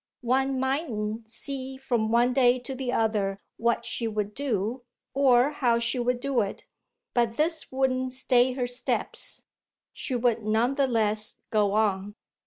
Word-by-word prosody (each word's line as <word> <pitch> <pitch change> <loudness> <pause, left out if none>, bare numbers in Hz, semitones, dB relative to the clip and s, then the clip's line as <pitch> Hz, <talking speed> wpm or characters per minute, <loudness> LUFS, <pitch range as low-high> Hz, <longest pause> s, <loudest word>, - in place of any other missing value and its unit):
One 265 +2 +1
mightn't 230 -6 -2
see 265 +2 -3
from 240 -5 0
one 240 +2 +3
day 250 -1 +4
to 250 +2 -6
the 260 -1 -3
other 210 -4 0 0.2
what 235 0 +1
she 230 - -2
would 210 -1 -2
do 240 -2 -2 0.3
or 265 0 +4
how 245 -5 +2
she 235 +2 0
would 245 0 0
do 275 -1 0
it, 200 -1 -4 0.5
but 235 -2 +1
this 320 +1 0
wouldn't 260 -1 0
stay 255 -1 +3
her 250 -1 -1
steps 245 +1 -3 0.5
she 260 - -3
would 235 -2 +1
none 220 +4 +1
the 275 -1 +2
less 215 -3 0 0.2
go 210 -2 +2
on. 205 -1 0
245 Hz, 155 wpm, -27 LUFS, 220-265 Hz, 0.5 s, day